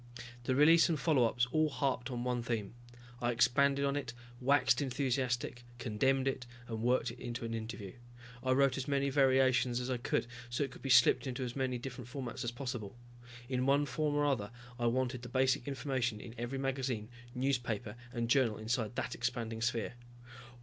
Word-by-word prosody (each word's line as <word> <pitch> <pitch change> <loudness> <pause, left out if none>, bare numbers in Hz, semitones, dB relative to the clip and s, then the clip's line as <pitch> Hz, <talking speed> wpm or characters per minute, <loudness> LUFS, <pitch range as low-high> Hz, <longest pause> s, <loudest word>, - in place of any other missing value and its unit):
The 130 - +1
release 160 +5 +6
and 160 -3 0
follow 140 -5 +3
ups 120 +1 +1
all 155 +1 +3
harped 130 -1 -1
on 120 -2 -3
one 125 -1 0
theme. 115 -3 -3 0.5
I 120 - +1
expanded 140 +4 +3
on 140 0 0
it, 130 -5 -3 0.3
waxed 130 0 +3
enthusiastic, 125 -3 -1
condemned 130 +3 +1
it, 130 -2 -2 0.2
and 110 -1 -4
worked 125 0 +2
it - - -12
into 120 -1 -5
an 115 - -4
interview. 110 -3 -5 0.5
I 130 0 +2
wrote 140 0 +3
as 135 +1 -3
many 140 -1 +1
variations 130 -2 +3
as 125 +1 -3
I 125 - 0
could, 120 - 0 0.2
so 120 +4 0
it 135 - -4
could - - -12
be 135 - -4
slipped 125 +2 +6
into 130 +1 -3
as 120 -1 -4
many 130 -2 -1
different 125 0 -7
formats 130 -2 -5
as 120 - -1
possible. 120 -3 -5 0.5
In 130 0 0
one 140 +1 +4
form 145 +2 -1
or 145 0 +2
another 120 -8 0 0.3
I 120 - +1
wanted 125 +1 0
the 120 - -8
basic 130 0 +2
information 130 -5 -1
in 115 - -9
every 120 +2 -4
magazine, 130 -5 -2 0.3
newspaper 120 -5 -1 0.2
and 120 -2 -2
journal 120 -3 +3
inside 110 +1 -2
that - - -2
expanding 115 -2 -3
sphere. 120 -1 -1
125 Hz, 185 wpm, -33 LUFS, 120-135 Hz, 0.5 s, release